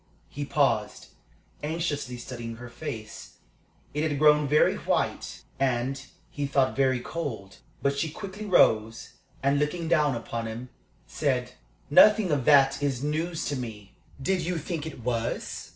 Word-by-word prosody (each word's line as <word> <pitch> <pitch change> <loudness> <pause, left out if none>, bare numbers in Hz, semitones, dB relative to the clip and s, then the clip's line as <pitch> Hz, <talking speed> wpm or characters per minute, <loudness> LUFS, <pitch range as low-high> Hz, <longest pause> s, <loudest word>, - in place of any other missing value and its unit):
He 145 0 -5
paused, 125 -8 0 0.5
anxiously 150 -5 -2
studying 120 -1 -7
her 120 +1 -10
face. 120 -4 -7 0.6
It 150 - -1
had 145 - -2
grown 150 0 +5
very 150 +2 +4
white, - - -2 0.2
and, 135 +1 0 0.3
he 145 -1 -2
thought, 135 -1 +2
very 130 -2 +2
cold. 115 -9 -5 0.3
But 140 0 +1
she 160 - 0
quickly 200 +5 -7
rose, 115 - +3 0.3
and, 140 +1 +3
looking 160 +3 -1
down 150 -5 +3
upon 115 0 -4
him, 115 +3 -7 0.4
said: - - -1 0.4
"Nothing 210 +3 +6
of 140 -4 0
that 140 -2 +5
is 135 -2 -1
news 160 +3 -2
to 145 - -1
me. 110 -6 -7 0.3
Did 185 +7 0
you 175 +1 -2
think 160 0 -4
it 155 - -8
was?" 115 -1 -3
140 Hz, 145 wpm, -27 LUFS, 120-155 Hz, 0.6 s, Nothing